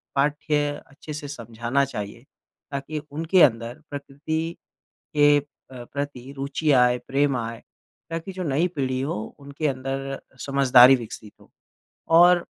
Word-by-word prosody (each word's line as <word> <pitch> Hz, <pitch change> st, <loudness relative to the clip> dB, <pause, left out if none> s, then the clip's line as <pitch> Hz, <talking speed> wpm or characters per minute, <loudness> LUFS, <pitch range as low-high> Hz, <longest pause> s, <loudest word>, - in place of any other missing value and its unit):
पाठ्य 145 Hz, +1 st, +1 dB, 0.2 s
अच्छे 150 Hz, +2 st, -10 dB
से 145 Hz, -1 st, -6 dB
समझाना 120 Hz, 0 st, -2 dB
चाहिए, 105 Hz, -1 st, -7 dB, 0.5 s
ताकि 140 Hz, +2 st, -4 dB
उनके 165 Hz, +5 st, +2 dB
अंदर 115 Hz, -2 st, +2 dB
प्रकृति 155 Hz, +4 st, -4 dB, 0.6 s
के 145 Hz, 0 st, +6 dB
अ, -, -, -2 dB, 0.3 s
प्रति 135 Hz, +1 st, -6 dB
रुचि 140 Hz, +3 st, -1 dB
आए, 125 Hz, -1 st, +4 dB
प्रेम 140 Hz, -1 st, +2 dB
आए 115 Hz, -1 st, -5 dB, 0.5 s
ताकि 165 Hz, +4 st, -4 dB
जो 185 Hz, -, -5 dB
नई 155 Hz, +1 st, +1 dB
पीढ़ी 130 Hz, -2 st, -1 dB
हो 140 Hz, +4 st, -2 dB, 0.2 s
उनके 140 Hz, +2 st, -4 dB
अंदर 135 Hz, +1 st, -4 dB, 0.3 s
समझदारी 135 Hz, -2 st, +7 dB
विकसित 110 Hz, -3 st, -9 dB
हो। -, -, -20 dB, 0.7 s
और 175 Hz, 0 st, +6 dB
140 Hz, 130 wpm, -24 LUFS, 125-150 Hz, 0.7 s, समझदारी